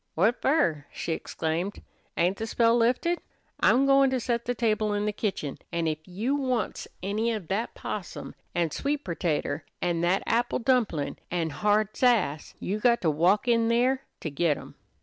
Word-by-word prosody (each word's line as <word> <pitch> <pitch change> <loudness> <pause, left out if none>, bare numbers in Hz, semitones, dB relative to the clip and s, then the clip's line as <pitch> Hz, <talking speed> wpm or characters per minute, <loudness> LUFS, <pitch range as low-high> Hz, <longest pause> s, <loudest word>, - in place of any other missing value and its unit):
"What 215 +9 +2
fer?" 170 - +2
she - - -4
exclaimed. 165 +5 -3 0.3
"Ain't 180 +3 +2
the 225 - -3
spell 230 +1 +3
lifted? 250 +9 +2 0.4
I'm 265 +2 +4
goin' 275 0 +5
to 260 -1 0
set 235 0 -1
the 245 - -1
table 215 -2 +1
in 205 0 0
the 210 - 0
kitchen, 190 -10 -3
an' 170 -1 -1
ef 155 -1 -1
you 210 +9 -2
wants 255 -5 -1 0.2
any 215 +4 0
of 210 -7 -4
that 215 +5 -2
possum 205 -4 -6 0.2
an' 170 -2 +1
sweet 285 - -2
pertater 160 -3 -1 0.2
an' 170 -1 0
that 175 +3 +2
apple 240 +1 +1
dumplin' 230 - +1
an' 165 -2 -1
hard 210 +4 +1
sass, 210 - +1
you 205 +3 -2
got 235 +1 +3
to 165 -4 +2
walk 180 - +2
in 230 -1 +3
there 250 +3 +2 0.2
to 160 - -4
git 150 +1 +1
em." - - -11
210 Hz, 175 wpm, -27 LUFS, 170-240 Hz, 0.4 s, goin